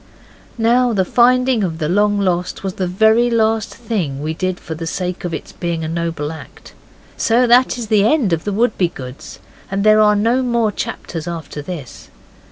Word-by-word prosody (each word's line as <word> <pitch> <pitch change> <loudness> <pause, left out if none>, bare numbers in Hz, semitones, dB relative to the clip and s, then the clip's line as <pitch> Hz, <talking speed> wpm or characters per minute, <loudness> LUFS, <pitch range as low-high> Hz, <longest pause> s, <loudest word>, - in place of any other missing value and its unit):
Now 240 +1 +3
the 190 -3 +1
finding 250 +1 +3
of 165 -4 -2
the 155 -2 -2
long 205 +4 +2
lost 180 -2 -1
was 190 -1 -3
the 185 -1 -2
very 220 +6 +3
last 225 -2 +1
thing 195 - -3
we 155 +1 -2
did 185 +2 -3
for 160 - -7
the 165 +1 -6
sake 180 +2 -4
of 175 - -3
its - - -6
being 170 -2 -3
a - - -3
noble 165 -2 -3
act, 160 - -12 0.4
so 235 +2 +3
that 245 +1 +4
is 240 - -4
the 210 -2 +3
end 225 - +2
of 165 0 -1
the 205 - -2
Wouldbegoods, 180 - -2 0.3
and 195 +1 -1
there 215 0 +5
are 210 -1 +5
no 230 +5 +2
more 235 -4 +1
chapters 165 -4 -5
after 165 -3 -6
this. 145 -6 -8
195 Hz, 185 wpm, -18 LUFS, 170-230 Hz, 0.4 s, there